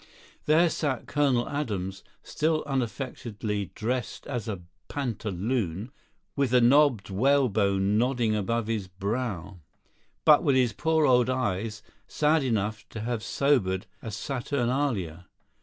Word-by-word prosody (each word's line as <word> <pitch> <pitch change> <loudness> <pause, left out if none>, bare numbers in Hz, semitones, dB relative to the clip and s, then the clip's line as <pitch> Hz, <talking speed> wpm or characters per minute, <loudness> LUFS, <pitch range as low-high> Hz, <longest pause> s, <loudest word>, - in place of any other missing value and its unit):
There 160 +2 +5
sat 140 -6 -2
Colonel 135 -5 +1
Adams, 100 -10 -3 0.2
still 155 +1 0
unaffectedly 115 -5 -3
dressed 120 +1 -3
as 120 -6 -4
a 100 -5 -4 0.2
pantaloon, 110 - -2 0.4
with 140 -2 +1
the 125 +1 +5
knobbed 125 -5 +4
whalebone 105 -4 +2
nodding 120 -3 +1
above 110 +3 -1
his 110 -4 -2
brow, 100 -1 -4 0.7
but 150 -1 +7
with 140 -5 +3
his 125 -3 +3
poor 160 +2 +2
old 125 -2 +4
eyes 105 -4 -2 0.2
sad 155 +1 +2
enough 110 -4 -1
to 110 - -6
have 115 0 -2
sobered 100 -7 +1 0.2
a 115 - -6
Saturnalia. 120 - -2
120 Hz, 120 wpm, -27 LUFS, 100-135 Hz, 0.7 s, but